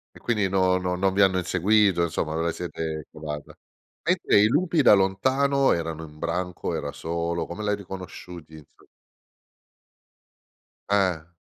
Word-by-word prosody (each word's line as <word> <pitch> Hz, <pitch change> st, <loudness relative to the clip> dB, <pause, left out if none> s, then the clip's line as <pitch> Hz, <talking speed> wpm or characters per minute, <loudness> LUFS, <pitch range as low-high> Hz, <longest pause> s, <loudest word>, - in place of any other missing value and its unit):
E -, -, -14 dB
quindi, 105 Hz, -5 st, 0 dB
no 95 Hz, -1 st, +2 dB
no 90 Hz, 0 st, -2 dB
non 95 Hz, +1 st, +1 dB
vi 100 Hz, -, 0 dB
hanno 95 Hz, -1 st, +4 dB
inseguito, 95 Hz, +1 st, +2 dB
insomma, 80 Hz, -2 st, -2 dB
ve 80 Hz, -, -1 dB
la 85 Hz, -, +1 dB
siete 80 Hz, -2 st, -5 dB
cavata. 75 Hz, -2 st, -7 dB, 0.5 s
Mentre 100 Hz, -, +3 dB
i 105 Hz, -, +6 dB
lupi 165 Hz, +6 st, +1 dB
da 115 Hz, -, +7 dB
lontano 130 Hz, +9 st, +2 dB
erano 80 Hz, -1 st, -3 dB
in 75 Hz, -1 st, -13 dB
branco, 90 Hz, +2 st, -3 dB
era 70 Hz, -, -4 dB
solo, 85 Hz, +1 st, -3 dB
come 105 Hz, +5 st, -7 dB
l'hai 105 Hz, -1 st, 0 dB
riconosciuti, 90 Hz, -4 st, -9 dB
inso 75 Hz, -2 st, -17 dB, 2.0 s
Eh. 90 Hz, -5 st, +1 dB
90 Hz, 145 wpm, -25 LUFS, 80-100 Hz, 2.0 s, da